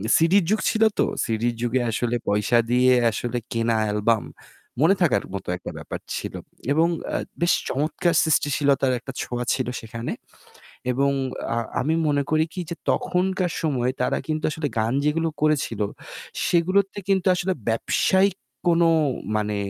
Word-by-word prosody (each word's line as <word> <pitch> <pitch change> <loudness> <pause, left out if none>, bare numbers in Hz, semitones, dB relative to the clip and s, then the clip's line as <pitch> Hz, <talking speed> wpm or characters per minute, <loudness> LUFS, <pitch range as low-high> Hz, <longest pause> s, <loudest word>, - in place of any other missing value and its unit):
সিডির 175 +4 +4
যুগ 215 +1 +2
ছিল 225 -1 +2 0.2
তো। - - +5 0.2
সিডির 115 +1 -1
যুগে 120 +1 +1
আসলে 120 +2 -1
পয়সা 105 +4 +2
দিয়ে 125 +1 +5 0.2
আসলে 120 +2 -3
কেনা 115 0 +1
অ্যালবাম 105 +1 +1 0.6
মনে 185 +5 +5
থাকার 150 - +3
মতো 100 - -5
একটা - - -7
ব্যাপার - - -6 0.2
ছিল। - - -5 0.4
এবং 160 +3 +4 0.2
অ্যা - - -1 0.2
বেশ 170 - +4
চমৎকার 155 +5 0
সৃষ্টিশীলতার 140 -3 +2
একটা - - -8
ছোঁয়া 120 0 -3
ছিল 130 -2 -1
সেখানে। 115 +1 -5 0.8
এবং 140 +2 +2 0.4
আ - - -1 0.2
আমি 155 +5 +1
মনে 145 -1 +2
করি 155 0 +3
কি 185 - -5
যে 170 - -4
তখনকার 185 -1 0
সময়ে 130 -6 0
তারা - - +1
কিন্তু 155 0 -2
আসলে 155 -2 -2
গান 115 +3 +1
যেগুলো 160 +2 +1
করেছিল 145 -8 +1 0.7
সেগুলোতে 185 +4 +2
কিন্তু 190 -1 +2
আসলে 185 +1 0 0.2
ব্যবসায়িক 190 - +2 0.3
কোন 170 0 +4 0.5
মানে 105 0 0
145 Hz, 145 wpm, -24 LUFS, 120-170 Hz, 0.8 s, তো